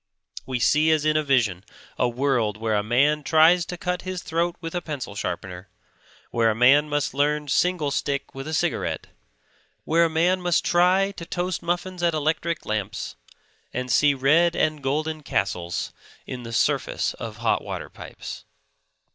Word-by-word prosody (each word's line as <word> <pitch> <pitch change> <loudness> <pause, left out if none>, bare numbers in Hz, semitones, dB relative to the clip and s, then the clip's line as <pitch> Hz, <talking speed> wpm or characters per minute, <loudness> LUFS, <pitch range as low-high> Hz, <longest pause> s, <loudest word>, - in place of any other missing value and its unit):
We 130 -1 -1
see 150 +7 +3
as 155 -1 +2
in 155 0 +3
a 155 - +3
vision 120 -11 +1 0.3
a 125 - +1
world 120 -4 0
where 110 0 -1
a 105 - +2
man 140 +8 +2
tries 160 +4 +4
to 180 - -5
cut 180 0 -2
his 185 -1 -5
throat 170 +1 -1
with 165 -1 -6
a 175 - -2
pencil 145 -10 -5
sharpener; 90 -1 -5 0.6
where 115 -1 +3
a 110 - 0
man 140 +6 +5
must 145 -3 -1
learn 150 +1 +1
single 165 0 +1
stick 140 0 -2
with 135 +2 -7
a 160 - -4
cigarette; - - -1 0.7
where 165 +2 +3
a - - +1
man 175 +4 +2
must 175 -2 +1
try 185 +3 +3
to 170 -4 -9
toast 175 0 -2
muffins 175 +1 -3
at 170 -2 +2
electric 155 +2 -1
lamps, 110 0 -3 0.6
and 125 0 -2
see 145 +5 +4
red 160 +6 +3
and 155 -1 0
golden 155 +3 -2
castles 85 - -2 0.3
in 125 - -6
the 115 -1 -8
surface 115 - 0
of - - -7
hot - - 0
water - - -5
pipes. - - -9
150 Hz, 170 wpm, -24 LUFS, 125-170 Hz, 0.7 s, man